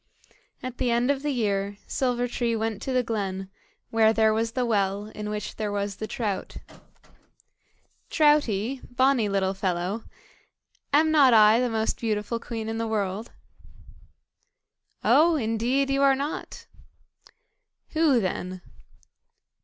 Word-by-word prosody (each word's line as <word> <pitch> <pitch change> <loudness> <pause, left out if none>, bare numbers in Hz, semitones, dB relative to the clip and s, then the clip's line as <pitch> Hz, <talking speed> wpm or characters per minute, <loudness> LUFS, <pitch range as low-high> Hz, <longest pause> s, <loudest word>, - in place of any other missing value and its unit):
At 255 -1 -6
the 250 - +1
end 240 +3 +2
of 275 -1 -2
the 295 - -2
year, 205 -6 -1
Silver 245 -2 -1
tree 235 -1 -1
went 220 -2 -2
to 265 - -3
the 255 -1 +2
glen, 195 -4 -3 0.4
where 220 -1 +4
there 220 -1 +3
was 225 +1 -1
the 250 0 0
well, 205 -2 0
in 210 0 -5
which 210 0 -5
there 215 -2 -2
was 200 -1 -3
the 215 - -5
trout. 215 -6 -4 1.5
"Troutie, 270 -6 +2
bonny 250 -3 +2
little 195 -1 0
fellow," 185 +2 -2
said - - -21
she, - - -32 0.2
"am 315 0 +1
not 275 -6 +6
I 215 +1 +6
the 250 0 +1
most 220 -1 -1
beautiful 220 0 -2
queen 225 -2 -5
in 225 0 -3
the 230 - -1
world?" 210 0 -2 1.7
"Oh! 330 +2 +5
indeed 250 +2 0
you 275 0 +1
are 275 -1 +5
not." 285 +3 -5 1.2
"Who 310 -6 +3
then?" 185 -2 -4
225 Hz, 140 wpm, -26 LUFS, 205-255 Hz, 1.7 s, not